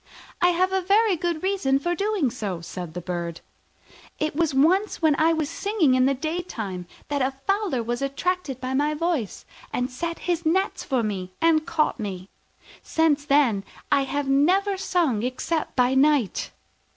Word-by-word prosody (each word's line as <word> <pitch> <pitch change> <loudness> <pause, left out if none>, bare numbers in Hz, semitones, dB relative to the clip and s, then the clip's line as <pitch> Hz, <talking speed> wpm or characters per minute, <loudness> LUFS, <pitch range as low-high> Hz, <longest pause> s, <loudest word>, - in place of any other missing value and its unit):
"I 355 - +5
have 365 +2 +2
a 380 - +2
very 400 +2 +3
good 340 -1 -2
reason 375 -9 +1
for 345 +5 -1
doing 395 - 0
so," 205 -8 -4
said 170 0 -7
the 180 - -4
Bird: 170 -2 -4 0.8
"it 310 -1 -2
was 325 -1 +1
once 350 +10 +2
when 315 -3 +3
I 320 +1 +4
was 315 -2 0
singing 335 -2 +1
in 255 0 +4
the 275 - +2
daytime 250 - -4 0.2
that 285 -1 0
a 260 +1 +1
fowler 390 - 0
was 240 +2 -3
attracted 275 0 -2
by 260 0 -3
my 295 +3 +1
voice, 315 - -2 0.3
and 250 +1 -2
set 335 +6 -4
his 345 -1 0
nets 375 +5 0
for 260 -5 0
me 185 -4 -4
and 325 -1 +3
caught 310 -5 0
me. 195 -3 -5 0.5
Since 305 -3 +1
then 270 -9 +3 0.3
I 275 - +3
have 285 +1 -2
never 365 +9 +3
sung 345 - 0
except 255 +6 -2
by 250 0 +3
night." 270 - +2
295 Hz, 170 wpm, -24 LUFS, 250-345 Hz, 0.8 s, I